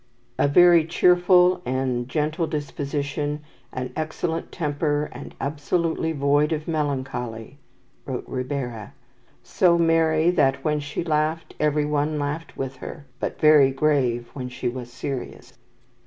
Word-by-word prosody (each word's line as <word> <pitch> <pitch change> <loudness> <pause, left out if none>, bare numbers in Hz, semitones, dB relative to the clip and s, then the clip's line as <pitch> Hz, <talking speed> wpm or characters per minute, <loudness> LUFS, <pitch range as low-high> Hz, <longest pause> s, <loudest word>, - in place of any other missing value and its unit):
"A - - +4
very 175 +2 +6
cheerful 180 +1 +4
and 130 -2 -2
gentle 155 +3 -1
disposition, 145 0 -3 0.3
an 125 0 -5
excellent 160 +1 -3
temper, 150 -1 -1
and 125 +3 -10
absolutely 160 +3 -1
void 145 +1 +2
of 155 -1 -2
melancholy," 135 -5 -3 0.5
wrote 130 -2 -4
Ribera. 125 -4 -4 0.5
"So 175 -2 +3
merry 165 0 +3
that 140 -5 +2
when 150 -1 +1
she 145 +3 -4
laughed, 155 0 -1
every 150 0 +2
one 150 +1 0
laughed 150 +3 -4
with 135 0 -4
her, 145 -3 -9
but - - -4
very 150 -3 +6
grave 135 -4 +1
when 125 -2 -5
she 125 - -4
was 120 0 -5
serious." 130 +1 -6
150 Hz, 125 wpm, -24 LUFS, 135-160 Hz, 0.5 s, very